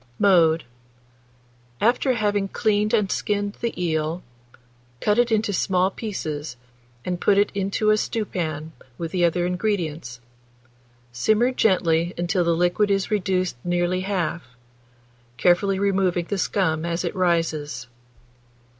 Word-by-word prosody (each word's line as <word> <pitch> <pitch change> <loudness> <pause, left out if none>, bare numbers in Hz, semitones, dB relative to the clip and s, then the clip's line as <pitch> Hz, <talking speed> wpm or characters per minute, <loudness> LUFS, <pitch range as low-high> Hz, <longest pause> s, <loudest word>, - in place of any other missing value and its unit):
Mode. 165 -5 +4 1.2
After 245 +4 +2
having 205 -3 0
cleaned 210 +1 0
and 210 -5 +1
skinned 205 -1 -1
the 235 -5 -3
eel, 160 0 -1 0.8
cut 210 - +2
it 240 -1 +2
into 215 -2 +1
small 185 +1 +1
pieces, 155 - -5 0.5
and 180 -1 -3
put 200 - +3
it 205 +1 +3
into 200 +2 +1
a 215 - +4
stewpan, 165 -9 -3 0.3
with 165 -1 -5
the 180 -2 0
other 175 +1 +2
ingredients; 175 - -2 0.9
simmer 215 - +2
gently 175 -7 +1
until 175 +1 0
the 170 -1 +2
liquid 180 +5 +2
is 195 0 0
reduced 185 - 0
nearly 175 +1 0
half, 185 -3 -2 1.0
carefully 190 +4 +3
removing 190 -3 +1
the 200 +2 -3
scum 160 -5 0
as 170 0 -2
it - - -3
rises. 160 -7 0
185 Hz, 125 wpm, -23 LUFS, 170-205 Hz, 1.2 s, Mode